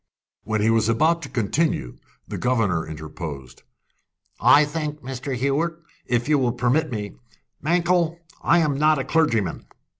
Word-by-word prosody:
When 110 Hz, -1 st, -1 dB
he 110 Hz, +2 st, +3 dB
was 115 Hz, -1 st, +2 dB
about 160 Hz, +9 st, +2 dB
to 135 Hz, -, -7 dB
continue, 115 Hz, -, -1 dB, 0.3 s
the -, -, -5 dB
governor 110 Hz, -11 st, +1 dB
interposed. 75 Hz, -4 st, -8 dB, 0.8 s
"I 145 Hz, +1 st, +6 dB
think, 150 Hz, -1 st, -4 dB
Mr. 130 Hz, +1 st, -4 dB
Hewett, 140 Hz, +7 st, 0 dB, 0.3 s
if 120 Hz, 0 st, 0 dB
you 150 Hz, -2 st, +3 dB
will 125 Hz, -3 st, +1 dB
permit 130 Hz, +6 st, +1 dB
me. 105 Hz, -, -5 dB, 0.4 s
Mankell, 170 Hz, +1 st, +1 dB, 0.2 s
I 170 Hz, -, +4 dB
am 145 Hz, -3 st, 0 dB
not 155 Hz, 0 st, +4 dB
a 135 Hz, -, -1 dB
clergyman." 120 Hz, -, 0 dB
130 Hz, 145 wpm, -23 LUFS, 110-155 Hz, 0.8 s, I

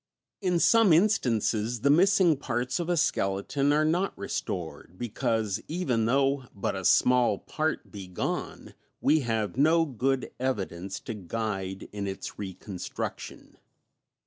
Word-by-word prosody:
] -, -, -63 dB
In 175 Hz, -, +3 dB
some 225 Hz, -1 st, +5 dB
instances 120 Hz, -, +2 dB
the 140 Hz, -, +4 dB
missing 185 Hz, 0 st, +5 dB
parts 125 Hz, 0 st, -2 dB
of 170 Hz, 0 st, -3 dB
a 175 Hz, -, +2 dB
skeleton 135 Hz, +4 st, +1 dB
are 155 Hz, +1 st, +3 dB
not 175 Hz, +5 st, 0 dB
restored, 85 Hz, 0 st, -5 dB
because, 110 Hz, -3 st, -1 dB
even 135 Hz, -10 st, 0 dB
though 135 Hz, +2 st, +2 dB
but 100 Hz, -, -2 dB
a 95 Hz, -, -4 dB
small 125 Hz, -4 st, +4 dB
part 155 Hz, +8 st, -3 dB
be 100 Hz, -3 st, -8 dB
gone, 90 Hz, -, -4 dB, 0.3 s
we 155 Hz, +3 st, +3 dB
have 115 Hz, -5 st, -2 dB
no 160 Hz, +4 st, +4 dB
good 135 Hz, -1 st, -1 dB
evidence 95 Hz, -7 st, -3 dB
to 115 Hz, -, -5 dB
guide 95 Hz, -1 st, -4 dB
in 100 Hz, -1 st, -4 dB
its 95 Hz, 0 st, -6 dB
reconstruction. 95 Hz, -1 st, -6 dB
125 Hz, 135 wpm, -28 LUFS, 100-155 Hz, 0.3 s, some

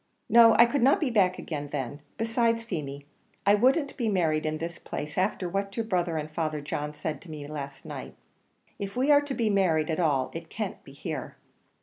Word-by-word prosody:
No, 230 Hz, 0 st, +8 dB
I 235 Hz, -, +8 dB
could 265 Hz, +3 st, 0 dB
not 270 Hz, +4 st, +5 dB
be 290 Hz, -6 st, 0 dB
back 190 Hz, -5 st, +3 dB
again 145 Hz, -3 st, -5 dB
then; 140 Hz, 0 st, -4 dB, 0.2 s
besides, 230 Hz, 0 st, +1 dB
Feemy, 145 Hz, -9 st, -5 dB, 0.4 s
I 200 Hz, -, +6 dB
wouldn't 265 Hz, +7 st, +3 dB
be 235 Hz, -4 st, 0 dB
married 160 Hz, -6 st, +1 dB
in 155 Hz, 0 st, -1 dB
this 165 Hz, +2 st, -5 dB
place 150 Hz, +1 st, -6 dB
after 185 Hz, -1 st, 0 dB
what 195 Hz, +2 st, -3 dB
your 230 Hz, -, 0 dB
brother 175 Hz, -6 st, 0 dB
and 155 Hz, 0 st, -4 dB
Father 155 Hz, -1 st, -2 dB
John 145 Hz, +1 st, -4 dB
said 150 Hz, -1 st, -4 dB
to 180 Hz, -, -14 dB
me 150 Hz, -2 st, -7 dB
last 140 Hz, -2 st, -7 dB
night. -, -, -7 dB, 0.6 s
If 200 Hz, 0 st, -5 dB
we 265 Hz, +4 st, +3 dB
are 290 Hz, 0 st, +7 dB
to 285 Hz, -2 st, -4 dB
be 225 Hz, -3 st, +1 dB
married 165 Hz, -6 st, +2 dB
at 160 Hz, -, -1 dB
all, 145 Hz, -6 st, +1 dB
it -, -, -7 dB
can't -, -, -5 dB
be -, -, -13 dB
here." -, -, -6 dB
180 Hz, 210 wpm, -28 LUFS, 155-230 Hz, 0.6 s, No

